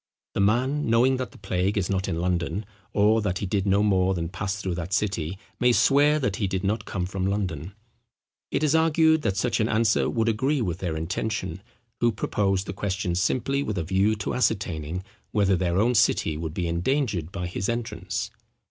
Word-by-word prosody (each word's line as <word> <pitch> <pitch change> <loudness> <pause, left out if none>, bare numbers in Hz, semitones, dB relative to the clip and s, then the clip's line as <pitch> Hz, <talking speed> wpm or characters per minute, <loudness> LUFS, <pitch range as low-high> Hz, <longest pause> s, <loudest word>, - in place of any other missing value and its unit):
The - - -2
man, 125 +9 +2
knowing 125 +3 +4
that 130 -1 -3
the - - -15
plague 95 +3 -1
is 95 -3 +1
not 95 -1 -1
in 80 - -2
London, 90 +2 -1 0.3
or 105 +2 +3
that 95 -4 -1
he 100 - -3
did 100 +1 -1
no 100 +1 +3
more 95 -2 +2
than 85 -1 -3
pass 95 +1 -3
through 95 -2 -2
that 85 +2 -4
city, 95 -5 -1 0.2
may 125 0 +4
swear 145 +4 +4
that 125 -10 -1
he 100 - 0
did 95 0 -2
not 105 +2 -1
come 90 -3 -2
from 95 0 -2
London. 95 -4 -2 0.8
It - - -1
is 150 -1 +3
argued, 160 0 +4
that 100 -8 -1
such 125 +5 0
an 110 +1 +1
answer 110 0 +2
would 115 -1 0
agree 130 +7 +1
with 90 -7 -2
their 85 -4 -2
intention, 95 +2 -3 0.4
who 120 0 +3
proposed 100 -2 0
the 95 - -5
question 95 -2 -2
simply 125 +9 0
with 105 -7 -3
a 90 - 0
view 95 +5 +2
to 105 - -3
ascertaining, 90 -8 -1 0.3
whether 100 -2 +3
their 90 -1 0
own 115 +5 +3
city 80 -7 +2
would 80 +1 -5
be 90 -2 -1
endangered 90 - -1
by 95 -2 -4
his 90 +2 -3
entrance. 110 -6 -3
100 Hz, 200 wpm, -25 LUFS, 90-115 Hz, 0.8 s, knowing